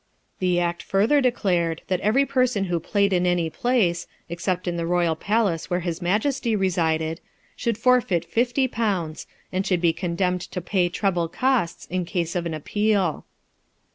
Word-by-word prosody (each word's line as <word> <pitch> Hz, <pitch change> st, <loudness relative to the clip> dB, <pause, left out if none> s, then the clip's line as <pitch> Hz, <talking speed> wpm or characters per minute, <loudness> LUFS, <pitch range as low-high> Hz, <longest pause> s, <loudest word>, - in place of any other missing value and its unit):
The 180 Hz, -1 st, +2 dB
Act 175 Hz, 0 st, -1 dB
further 220 Hz, +9 st, +2 dB
declared, 180 Hz, -10 st, 0 dB
that 185 Hz, -2 st, 0 dB
every 225 Hz, +8 st, +3 dB
person 255 Hz, -6 st, +1 dB
who 175 Hz, -3 st, -1 dB
played 200 Hz, +4 st, +1 dB
in 180 Hz, 0 st, +2 dB
any 175 Hz, -2 st, +1 dB
place, 185 Hz, -, +1 dB, 0.2 s
except 180 Hz, +2 st, -2 dB
in 175 Hz, -, -1 dB
the 170 Hz, -1 st, -2 dB
royal 175 Hz, -2 st, +2 dB
palace 200 Hz, -2 st, 0 dB
where 180 Hz, 0 st, 0 dB
his 170 Hz, 0 st, -3 dB
majesty 220 Hz, +6 st, 0 dB
resided, 165 Hz, -4 st, 0 dB, 0.3 s
should 230 Hz, -3 st, -1 dB
forfeit 230 Hz, -8 st, +2 dB
fifty 245 Hz, +3 st, +1 dB
pounds, 195 Hz, -10 st, -2 dB, 0.2 s
and 185 Hz, +1 st, 0 dB
should 180 Hz, -2 st, +1 dB
be 170 Hz, -1 st, +3 dB
condemned 180 Hz, +1 st, -1 dB
to 180 Hz, -, -5 dB
pay 180 Hz, 0 st, 0 dB
treble 180 Hz, -2 st, 0 dB
costs 245 Hz, -2 st, 0 dB
in 180 Hz, 0 st, -2 dB
case 170 Hz, -1 st, -2 dB
of 170 Hz, -1 st, -1 dB
an 160 Hz, -, -3 dB
appeal. 200 Hz, +1 st, 0 dB
180 Hz, 165 wpm, -24 LUFS, 170-215 Hz, 0.3 s, every